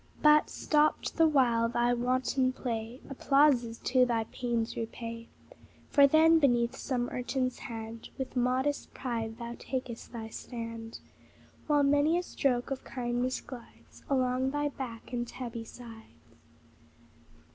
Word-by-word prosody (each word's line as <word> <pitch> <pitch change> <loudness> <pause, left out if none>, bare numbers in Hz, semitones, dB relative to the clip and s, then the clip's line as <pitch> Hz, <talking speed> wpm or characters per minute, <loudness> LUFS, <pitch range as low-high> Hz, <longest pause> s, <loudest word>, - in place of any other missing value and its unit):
But, 300 0 +6
stopped 300 0 +1
the 325 -1 +6
while 240 -6 +3
thy 240 +1 +2
wanton 255 +1 +1
play, 235 0 -4
Applauses 275 -4 +3
too 255 0 +3
thy 235 -2 +1
pains 235 0 -2
repay: 230 0 -6 0.6
For 280 -1 +7
then, 320 +3 +6
beneath 240 -5 +2
some 245 -3 -2
urchin's 255 0 -2
hand 225 -2 -7
With 265 -1 -5
modest 255 +3 0
pride 230 -3 -3
thou 235 0 -6
takest 255 -3 -5
thy 225 -2 -6
stand, 230 -1 -7 0.7
While 295 -1 +4
many 290 +4 +3
a 355 - -1
stroke 255 -6 -1
of 270 - -3
kindness 245 0 -2
glides 245 -3 -13
Along 255 -1 +1
thy 290 +1 -1
back 250 -4 -8
and 240 0 -2
tabby 235 -2 -6
sides. 225 -2 -13
250 Hz, 130 wpm, -30 LUFS, 235-275 Hz, 0.7 s, For